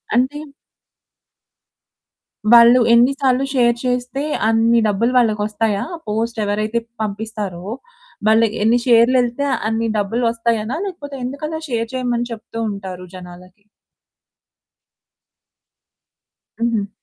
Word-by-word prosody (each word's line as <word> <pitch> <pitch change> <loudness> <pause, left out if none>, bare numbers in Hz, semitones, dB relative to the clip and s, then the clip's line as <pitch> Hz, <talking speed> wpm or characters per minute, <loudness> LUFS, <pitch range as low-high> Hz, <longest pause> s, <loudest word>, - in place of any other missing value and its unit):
అంటే? 265 +4 +1 2.1
వాళ్ళు 235 +1 +8
ఎన్ని 240 +3 +5
సార్లు 265 0 +2
షేర్ 240 -2 +3
చేస్తే 250 +2 -2 0.3
అన్ని 225 +1 +3
డబ్బులు 220 +4 +1
వాళ్ళకొస్తాయా? 210 -2 +1 0.2
పోస్ట్ 225 +2 -2
ఎవరైతే 215 +3 -1 0.2
పంపిస్తారో 205 -4 -5 0.6
వాళ్ళకి 220 0 +3
ఎన్ని 235 +2 +3
షేర్లు 240 +1 +5
యెళ్తే 245 +4 -2 0.2
అన్ని 225 0 -1
డబ్బులొస్తాయనా? 230 +3 -1
లేకపోతే 290 -7 -7
ఎందుకలా 305 +4 -5
షేర్ 230 -1 -2
చేయమని 240 -2 -1
చెప్తూ 225 0 -8
ఉంటారు 185 -2 -7
జనాలకి? 180 +2 -13 3.0
హుహు. 230 -4 0
230 Hz, 90 wpm, -19 LUFS, 210-245 Hz, 3.0 s, వాళ్ళు